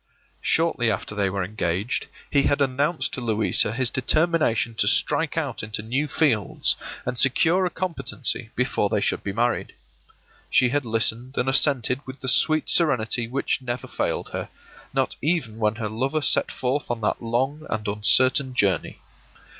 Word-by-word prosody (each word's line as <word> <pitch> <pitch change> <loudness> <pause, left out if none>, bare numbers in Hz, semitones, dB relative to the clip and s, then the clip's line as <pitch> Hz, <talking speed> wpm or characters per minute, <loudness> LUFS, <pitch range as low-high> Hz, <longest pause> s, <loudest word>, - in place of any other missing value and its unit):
Shortly 160 -8 +2
after 105 0 -3
they 100 -2 0
were 95 0 -2
engaged 95 +2 -2 0.2
he 140 - +4
had 145 - +1
announced 140 +4 0
to 130 - -3
Louisa 110 -2 +2
his 125 +1 0
determination 145 -4 +1
to 100 - +3
strike 160 +8 +2
out 140 -8 -2
into 105 0 -4
new 130 +7 -1
fields, 135 -9 +1 0.3
and 125 - -1
secure 165 +7 +3
a - - -3
competency 160 -9 -2
before 125 -5 0
they 105 - +1
should - - -1
be 100 - -3
married. 120 +4 -1 0.7
She 125 - +4
had 145 +1 -1
listened 115 +3 -1
and 125 - 0
assented 135 -2 +2
with 130 0 -8
the 130 - -5
sweet 155 +5 +3
serenity 120 -7 +2
which 135 +1 -1
never 120 -1 -5
failed - - -2
her, - - -5 0.4
not - - -1
even 140 -9 -1
when 105 -1 +1
her 115 -1 -3
lover 130 +8 -2
set - - +2
forth 130 +3 -2
on 120 -1 -3
that 105 - -1
long 130 +7 -2
and 110 -1 -3
uncertain 130 +6 +3
journey. 95 -8 +1
125 Hz, 160 wpm, -24 LUFS, 110-140 Hz, 0.7 s, he